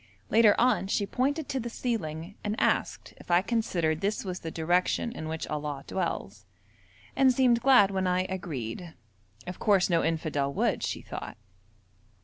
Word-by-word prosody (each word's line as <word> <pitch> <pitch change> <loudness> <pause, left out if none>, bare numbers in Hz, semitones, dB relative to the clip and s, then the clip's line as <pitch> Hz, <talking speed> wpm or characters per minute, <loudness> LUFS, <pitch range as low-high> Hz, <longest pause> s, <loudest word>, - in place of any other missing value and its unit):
Later 220 -2 +6
on 245 -5 +2
she 200 +1 0
pointed 280 +8 -1
to 270 - -1
the 240 -1 -4
ceiling, 175 -8 -3
and 210 +1 -2
asked - - 0
if - - -16
I 175 +1 +4
considered 170 -9 0
this 205 +1 -1
was 185 -1 -4
the 165 - -6
direction 175 +8 0
in 160 -9 -6
which 160 0 -4
Allah 150 -2 -4
dwells, 105 - -4 0.7
and 265 -1 +5
seemed 245 -2 +3
glad 245 -6 +6
when 190 -1 0
I 180 0 +2
agreed. 165 -4 -5 0.5
Of 180 0 -7
course 195 -3 +3
no 165 -1 +3
infidel 155 -4 -1
would, - - +1
she - - -3
thought. - - -7
185 Hz, 160 wpm, -28 LUFS, 160-230 Hz, 0.7 s, Later